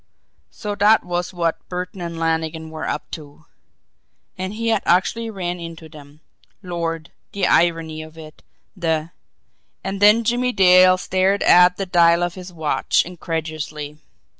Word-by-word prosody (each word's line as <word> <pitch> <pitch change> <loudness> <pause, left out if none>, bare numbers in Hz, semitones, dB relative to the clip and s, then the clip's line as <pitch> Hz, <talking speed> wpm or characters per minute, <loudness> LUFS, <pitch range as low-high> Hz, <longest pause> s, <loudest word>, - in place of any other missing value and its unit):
So 210 -1 -5
that 205 +2 +4
was 175 0 -3
what 170 -2 -3
Burton 180 +1 -5
and 170 -1 -5
Lannigan 160 -1 -2
were 160 0 -5
up - - -5
to! 150 -1 -10 0.9
And 185 +2 -5
he 230 +1 -2
had 220 -3 +2
actually 225 +6 +1
run 180 -4 -4
into 165 -1 -9
them! 150 -1 -15 0.4
Lord, 165 -2 -4 0.2
the 200 -2 0
irony 165 -2 +1
of 155 +1 -12
it! 155 -1 -12 0.3
The 165 -3 -1 0.7
And 195 0 -4
then 210 +3 +6
Jimmie 245 +2 0
Dale 185 -1 +6
stared 190 +2 +1
at 180 0 +6
the 195 - -2
dial 170 -1 +4
of 175 -1 -2
his 185 0 -10
watch 160 -3 0
incredulously. 155 -3 -5
175 Hz, 145 wpm, -21 LUFS, 160-185 Hz, 0.9 s, then